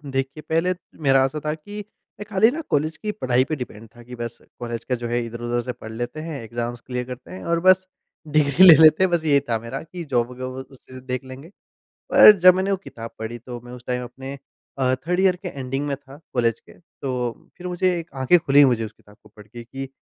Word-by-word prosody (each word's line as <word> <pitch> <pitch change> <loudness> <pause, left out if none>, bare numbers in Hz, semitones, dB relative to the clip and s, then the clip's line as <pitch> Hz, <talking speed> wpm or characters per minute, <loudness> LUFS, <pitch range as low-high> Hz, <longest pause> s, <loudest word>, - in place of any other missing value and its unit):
देखिए, 135 +3 -2
पहले 165 +3 +2 0.3
मेरा 135 0 +5
ऐसा 145 +3 -3
था 150 - 0
कि 205 +7 -9 0.4
मैं 210 - -6
खाली 220 +2 +4
ना 320 +3 -4
कॉलेज 155 +2 0
की 210 -1 -3
पढाई 130 -10 +1
पर 155 - 0
डिपेंड 115 -4 -8
था 120 - -13
कि 125 +1 -10
बस 120 -1 -6 0.2
कॉलेज 120 -1 -5
का 125 - 0
जो 120 0 -5
है 120 0 0
इधर-उधर 120 +1 -3
से 125 - -4
पढ़ 110 -2 -10
लेते 120 +6 -5
हैं, 155 -5 -6
एग्ज़ॅाम्स 120 +1 -5
क्लियर 125 -1 -3
करते 125 +5 -9
हैं 185 - -8
और 170 0 +1
बस 185 0 +5 0.4
डिग्री 150 +2 +4
ले 165 - +11
लेते 155 +4 +7
हैं 185 - +3
बस 170 -2 +1
ये 145 -2 +5
था 115 - +2
मेरा 115 +4 -6
कि 170 +1 -8
जॉब 125 -4 -1
ग - - -10
व 130 - -6
उसी 130 -1 -17
से 130 - -8
देख 125 0 -4
लेंगे। 130 +5 -10 0.6
पर - - +10
जब 185 0 +8
मैंने 190 +2 0
वो 195 - +2
किताब 115 -11 -9
पढ़ी 110 +2 -5
तो 120 +1 -8
मैं 120 +1 -12
उस 125 -1 -11
टाइम 125 0 -2
अपने 135 +3 -8 0.4
अ, 130 -1 +2
3rd 175 +8 -2
ईयर 185 -2 +4
के 180 0 -7
एंडिंग 135 0 -4
में 140 -1 -2
था 140 +1 -15 0.2
कॉलेज 115 -2 +1
के - - -18 0.3
तो 125 -3 -3
फिर 180 - -7
मुझे 180 0 0
एक 165 0 -8
आँखें 130 +7 +4
खुली 145 -2 +5
मुझे 120 -4 +2
उस 110 - -7
किताब 105 -1 -21
को 105 - -18
पढ़ 105 -1 -13
के 120 +2 -10
कि 135 +3 -7
130 Hz, 245 wpm, -23 LUFS, 120-160 Hz, 0.6 s, ले